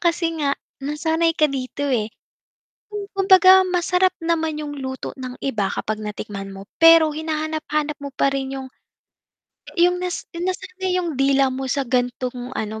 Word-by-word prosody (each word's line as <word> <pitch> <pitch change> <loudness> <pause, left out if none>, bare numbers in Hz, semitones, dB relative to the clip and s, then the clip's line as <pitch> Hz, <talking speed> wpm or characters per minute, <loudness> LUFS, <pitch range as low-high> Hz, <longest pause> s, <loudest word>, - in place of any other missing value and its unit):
kasi 340 0 +1
nga 285 -2 +1 0.3
nasanay 320 +3 +1
ka 310 -2 +3
dito, 270 +1 -4
eh. 225 -5 0 0.8
Hmm, 410 -1 -5
kumbaga 380 -1 +7
masarap 360 +1 +2
naman 325 -2 -1
'yung 295 -1 -5
luto 260 -1 -5
ng 255 -1 -6
iba 220 -8 -1
kapag 215 0 -3
natikman 205 -2 -6
mo, 195 0 -10
pero 330 -1 +8
hinahanap-hanap 310 -1 -2
mo 285 0 -6
pa 275 - +3
rin 270 0 -3
'yung 265 -1 -6 1.1
'yung, 355 +1 +4
nas 360 -1 -3
nasanay 370 +1 -2
'yung 340 -3 -3
dila 270 0 +3
mo 265 +1 -4
sa 275 +1 0
gan'tong 250 0 -2
ano 220 0 -4
300 Hz, 150 wpm, -22 LUFS, 260-335 Hz, 1.1 s, pero